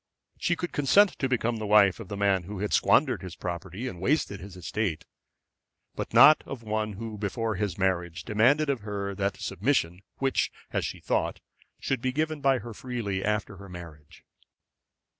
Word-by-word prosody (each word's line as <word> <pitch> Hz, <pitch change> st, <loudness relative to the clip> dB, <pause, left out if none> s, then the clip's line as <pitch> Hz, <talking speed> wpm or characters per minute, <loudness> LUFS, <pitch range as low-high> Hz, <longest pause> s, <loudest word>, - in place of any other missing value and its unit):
She 175 Hz, -, +1 dB
could 175 Hz, 0 st, -4 dB
consent 195 Hz, +8 st, +5 dB
to 135 Hz, -, 0 dB
become 120 Hz, -2 st, 0 dB
the 110 Hz, -1 st, -4 dB
wife 100 Hz, -2 st, +5 dB
of 115 Hz, -, -8 dB
the 100 Hz, -, -5 dB
man 100 Hz, -3 st, +2 dB
who 105 Hz, +2 st, -6 dB
had 105 Hz, +2 st, -2 dB
squandered -, -, +3 dB
his 90 Hz, -2 st, -8 dB
property 90 Hz, +6 st, -5 dB
and 90 Hz, -8 st, -7 dB
wasted 105 Hz, -4 st, 0 dB
his 95 Hz, 0 st, -10 dB
estate; 90 Hz, -1 st, -2 dB, 0.9 s
but -, -, -5 dB
not 155 Hz, +1 st, +8 dB
of 130 Hz, -4 st, -7 dB
one 110 Hz, -1 st, -2 dB
who 110 Hz, +1 st, -7 dB
before 110 Hz, +2 st, -1 dB
his 100 Hz, -2 st, -2 dB
marriage 85 Hz, -3 st, -1 dB
demanded 125 Hz, +9 st, +3 dB
of 140 Hz, -3 st, 0 dB
her 100 Hz, -1 st, -4 dB
that 100 Hz, 0 st, -2 dB
submission 95 Hz, -4 st, 0 dB, 0.2 s
which, 135 Hz, -1 st, +1 dB, 0.2 s
as -, -, -1 dB
she -, -, -5 dB
thought, -, -, -1 dB, 0.4 s
should 135 Hz, -3 st, -1 dB
be 130 Hz, -, 0 dB
given 155 Hz, +2 st, -1 dB
by 135 Hz, -1 st, +4 dB
her 120 Hz, -2 st, -7 dB
freely 110 Hz, -6 st, -3 dB
after 105 Hz, -1 st, -1 dB
her 100 Hz, 0 st, -11 dB
marriage. 85 Hz, -4 st, -11 dB
105 Hz, 180 wpm, -27 LUFS, 95-125 Hz, 0.9 s, not